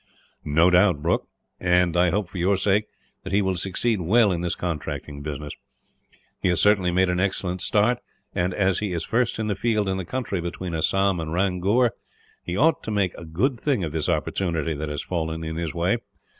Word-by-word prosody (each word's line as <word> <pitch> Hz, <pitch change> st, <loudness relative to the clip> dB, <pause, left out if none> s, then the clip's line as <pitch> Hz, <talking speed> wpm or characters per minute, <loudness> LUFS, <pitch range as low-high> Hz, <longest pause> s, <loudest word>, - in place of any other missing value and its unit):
"No 80 Hz, +5 st, +4 dB
doubt, 90 Hz, -4 st, +4 dB
Brooke; 85 Hz, -, 0 dB, 0.3 s
and 90 Hz, -1 st, +2 dB
I 90 Hz, 0 st, +4 dB
hope, 100 Hz, +2 st, 0 dB
for 90 Hz, -, -7 dB
your 95 Hz, +3 st, +2 dB
sake, 100 Hz, +2 st, +2 dB, 0.4 s
that -, -, -6 dB
he 100 Hz, +1 st, +3 dB
will 95 Hz, -1 st, 0 dB
succeed 95 Hz, +4 st, 0 dB
well 105 Hz, +4 st, +4 dB
in 85 Hz, -2 st, -1 dB
this 85 Hz, -1 st, -1 dB
contracting 75 Hz, -4 st, -4 dB
business. 75 Hz, 0 st, -5 dB, 0.9 s
He -, -, 0 dB
has 90 Hz, -, +2 dB
certainly 100 Hz, -3 st, +4 dB
made 95 Hz, +2 st, +3 dB
an 90 Hz, 0 st, 0 dB
excellent 95 Hz, -1 st, -1 dB
start 110 Hz, +6 st, +2 dB, 0.3 s
and, 90 Hz, +1 st, 0 dB
as 95 Hz, 0 st, +1 dB
he 105 Hz, -4 st, -2 dB
is 85 Hz, -1 st, -2 dB
first 120 Hz, 0 st, 0 dB
in 110 Hz, -, -2 dB
the 105 Hz, -, 0 dB
field 105 Hz, 0 st, 0 dB
in 95 Hz, 0 st, 0 dB
the 95 Hz, -, -3 dB
country 105 Hz, -3 st, -3 dB
between 85 Hz, +1 st, -5 dB
Assam 95 Hz, +3 st, +1 dB
and 80 Hz, -1 st, -4 dB
Ramgur, 100 Hz, +6 st, +2 dB, 0.5 s
he 90 Hz, +2 st, -3 dB
ought 160 Hz, +6 st, +3 dB
to -, -, -6 dB
make 100 Hz, -4 st, +1 dB
a 85 Hz, -, -9 dB
good 115 Hz, -, 0 dB
thing 130 Hz, -9 st, 0 dB
of 80 Hz, -, -3 dB
this 80 Hz, 0 st, -1 dB
opportunity 80 Hz, -4 st, -1 dB
that 75 Hz, +1 st, -4 dB
has 75 Hz, -1 st, -3 dB
fallen 80 Hz, -2 st, -3 dB
in 80 Hz, 0 st, -4 dB
his 85 Hz, -2 st, -3 dB
way. 90 Hz, +7 st, +1 dB
90 Hz, 205 wpm, -24 LUFS, 85-100 Hz, 0.9 s, No